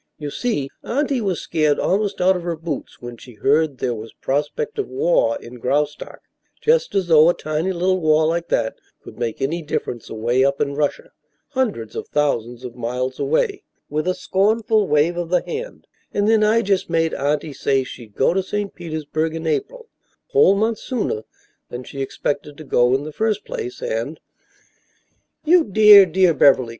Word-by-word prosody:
You 145 -1 -6
see, 215 - -2 0.2
Auntie 275 0 -1
was 190 -6 -1
scared 155 -2 +1
almost 200 +1 0
out 185 +1 +4
of 180 - -3
her 170 -1 -3
boots 155 -6 -6
when 120 -1 -7
she 120 0 -14
heard 145 +5 +1
there 125 0 -1
was 110 0 -8
prospect 150 - -2
of 415 - -1
war 475 -6 +1
in 125 +1 -11
Graustark, 145 +4 -2 0.4
just 470 - +2
as 195 -2 +2
though 160 -1 +6
a 175 - +2
tiny 155 +4 -2
little 185 +1 +1
war 155 0 +3
like 170 +1 -1
that 110 - -1 0.3
could - - -12
make 120 +2 -3
any 165 +5 -1
difference 125 -6 -4
away 120 +4 +1
up 140 0 +1
in 140 -1 0
Russia 145 0 -2 0.4
hundreds 230 - -2
of - - -5
thousands 125 -4 -1
of 120 - -7
miles 125 +2 -3
away 395 - 0
" - - -50
(with 155 +3 -1
a 185 - +1
scornful 215 +1 +1
wave 155 +4 +2
of 175 -1 -3
the 180 0 +2
hand) 475 +2 -6 0.3
"and 205 0 0
then 220 -1 +4
I 225 +2 +3
just 195 -3 0
made 165 -1 +1
Auntie 145 +2 -1
say 135 -1 +1
she'd 120 -4 -11
go 135 - +2
to 190 - +1
St. 205 +1 -4
Petersburg 160 -1 -3
in 165 0 -5
April 465 - -2 0.4
a - - -36
whole 430 - +6
month 220 +2 0
sooner 210 - -3 0.4
than 125 +1 -6
she 135 +2 -7
expected 145 +2 -3
to 155 - -9
go 125 -2 +3
in 135 - -2
the 155 0 -7
first 215 +1 -1
place 445 -4 -6
and - - -3 0.6
" - - -44
"You 340 +2 +5
dear, 205 -2 +8
dear 180 0 +3
Beverly!" 135 -4 +4
160 Hz, 190 wpm, -21 LUFS, 140-210 Hz, 0.6 s, dear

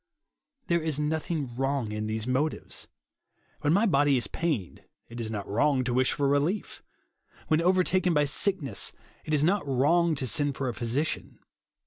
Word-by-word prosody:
There 170 -1 +1
is 155 -2 -1
nothing 155 +1 -1
Avrong 130 -1 -2
in 105 0 -3
these 110 0 -2
motives. 135 +5 -2 0.7
When 150 - +1
my 200 +7 +4
body 145 - +3
is 120 - +1
pained, 150 - -3 0.3
it 120 0 -6
is 110 - -4
not 105 -2 -4
wrong 130 +5 +2
to 125 -1 -1
wish 130 +1 +3
for 140 - 0
relief 145 +9 0 0.7
When 155 +1 +3
overtaken 185 +1 +2
by 150 -2 +3
sick 190 +5 +1
ness, 110 -8 -1 0.3
it 155 - -5
is 150 -1 +2
not 195 +5 +2
wrong 155 +5 +3
to 135 - -3
send 145 +2 0
for 135 - -2
a 120 - -2
physi 120 +7 -1
cian. - - -5
145 Hz, 175 wpm, -28 LUFS, 125-160 Hz, 0.7 s, my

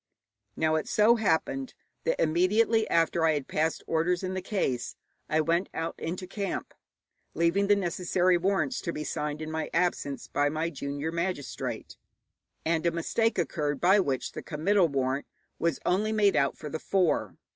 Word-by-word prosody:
Now, 155 0 +1
it 155 - -3
so 220 +3 +4
happened 240 - 0 0.3
that - - +1
immediately 210 +7 +3
after 165 0 +2
I 160 -1 +4
had 145 -2 -3
passed 160 +1 -1
orders 175 +3 0
in 185 0 -2
the 185 - -2
case 135 - -2 0.3
I 155 +1 +3
went 170 +4 +1
out 165 +1 -2
into 180 +3 -4
camp, 195 +1 -4 0.6
leaving 170 +5 +2
the 205 - +5
necessary 180 -1 +1
warrants 195 +9 0
to 170 - -2
be 150 - -4
signed 150 0 -3
in 155 - -5
my 160 -1 -3
absence 170 -5 0
by 145 +1 +1
my 160 +3 -2
junior 145 +2 -4
magistrate, 170 -3 -4 0.7
and 160 0 +1
a - - +3
mistake 225 +7 0
occurred 150 -4 -1
by 190 +4 +5
which 135 -9 -1
the - - -6
committal 175 +4 +2
warrant 135 -1 -1 0.3
was 170 0 0
only 210 +4 +1
made 210 -2 +3
out 140 -1 +2
for 155 - -7
the 160 - -3
four. 185 -1 0
170 Hz, 165 wpm, -28 LUFS, 155-195 Hz, 0.7 s, the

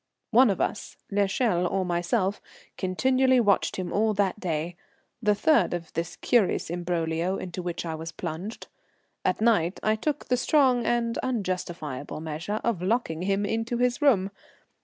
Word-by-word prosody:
One 245 +1 +6
of 195 - 0
us, 210 - -3
l'Echelle 200 -2 +1
or 190 +1 -1
myself, 185 +3 0 0.3
continually 260 +7 +2
watched 205 -4 +2
him 185 -2 -4
all 215 +1 +2
that 200 0 0
day, 170 -1 -2 0.5
the 210 -2 +3
third 290 - +3
of 170 -2 -7
this 165 +1 -3
curious 220 -8 +1
imbroglio 175 +1 -1
into 180 0 -5
which 175 -1 -4
I 165 - -3
was 160 +1 -6
plunged. 180 +10 -6 0.6
At - - 0
night 205 -6 +2
I 215 0 +3
took 290 +6 -2
the 250 - +1
strong 255 -3 +3
and 235 -1 0
unjustifiable 175 - -3
measure 160 +7 -4
of 230 -7 0
locking 185 -5 0
him 195 +2 0
into 225 +3 -1
his 250 +3 +1
room. 200 -10 +3
195 Hz, 155 wpm, -26 LUFS, 175-235 Hz, 0.6 s, One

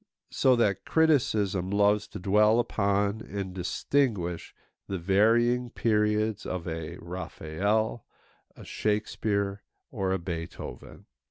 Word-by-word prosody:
So 130 -1 +4
that 105 -5 +1
criticism 110 - +2
loves 105 +1 +2
to - - -8
dwell 105 +4 +4
upon 100 -1 0
and 95 -3 -5
distinguish 90 -1 -1 0.3
the 95 - -3
varying 115 +7 +3
periods 105 -1 +1
of 90 -1 -4
a 80 -1 -5
Raphael, 95 +6 -2 0.5
a - - -12
Shakespeare, 105 -1 -1 0.3
or 95 -1 -1
a 95 - +1
Beethoven. 85 -7 -7
100 Hz, 105 wpm, -28 LUFS, 95-110 Hz, 0.5 s, So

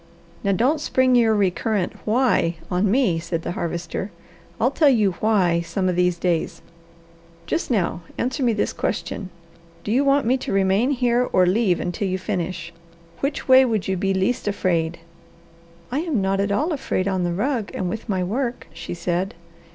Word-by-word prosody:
"Now 200 - +2
don't 260 +10 +2
spring 260 -3 +2
your 225 -2 +4
recurrent 200 0 0
'why' 220 -7 +2 0.2
on 185 +3 +2
me," 220 -7 +2
said 165 0 -4
the - - -3
Harvester. 170 +2 -4 0.5
"I'll 250 +4 +2
tell 295 +1 +4
you 215 -7 +3
'why' 185 -6 +2
some 170 +3 -2
of 180 - +1
these 180 -1 +2
days. 170 -2 -1 0.8
Just 330 - -2
now 190 -7 0 0.2
answer 260 +3 -2
me 245 -2 +3
this 210 - -1
question: 190 - -3 0.5
Do 210 - -3
you 260 +5 +3
want 280 -1 +3
me 255 +3 +3
to - - -5
remain 195 +5 +2
here 250 -2 +1
or 185 - +4
leave 185 -1 +2
until 180 +3 -2
you 185 0 -1
finish? 180 -3 -4 0.5
Which 280 +1 -2
way 260 0 +8
would 220 -6 -1
you 190 - 0
be 195 +1 0
least 190 +5 0
afraid?" 175 -5 0 0.9
"I 265 - 0
am 315 -8 -1
not 195 0 0
at 200 0 0
all 300 - +1
afraid 230 -9 -1
on 190 -2 0
the 175 - 0
rug 220 +4 -1
and 185 - -2
with 220 +5 -5
my 185 -2 0
work," 240 +6 -2
she 165 +1 -6
said. 175 +2 -2
200 Hz, 180 wpm, -22 LUFS, 180-245 Hz, 0.9 s, way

